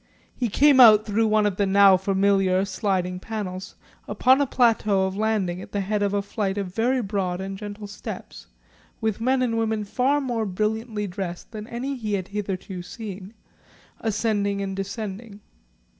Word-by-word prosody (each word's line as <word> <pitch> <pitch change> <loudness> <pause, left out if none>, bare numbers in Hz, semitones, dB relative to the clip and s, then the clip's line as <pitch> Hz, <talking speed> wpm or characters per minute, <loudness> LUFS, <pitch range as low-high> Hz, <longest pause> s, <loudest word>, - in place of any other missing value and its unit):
He 245 -2 -1
came 280 +5 +5
out 215 -3 +8
through 220 +1 +1
one 215 0 +3
of 200 -3 0
the 200 - +1
now 195 0 +6
familiar 195 0 +2
sliding 185 -2 -1
panels 190 -3 -6 0.3
upon 260 +2 +3
a 285 - +1
plateau 215 -6 +2
of 190 0 -3
landing 200 -4 -1
at - - -12
the 205 - 0
head 205 +2 -1
of 200 -1 +1
a 200 0 0
flight 200 -1 -2
of 190 -3 -4
very 245 +4 +1
broad 190 -3 -2
and 195 0 -5
gentle 205 +1 -7
steps, 200 0 -8 0.5
with 220 -1 -2
men 255 +2 +2
and 230 -2 0
women 220 -1 0
far 260 +7 +1
more 240 -6 -2
brilliantly 215 +2 -2
dressed 180 -1 -6
than 215 -1 -7
any 255 +4 -4
he 215 -3 -3
had 190 -2 -2
hitherto 195 -2 -4
seen, 200 +1 -8 0.6
ascending 205 -2 0
and 195 -1 -3
descending. 200 +1 -6
205 Hz, 170 wpm, -24 LUFS, 195-225 Hz, 0.6 s, out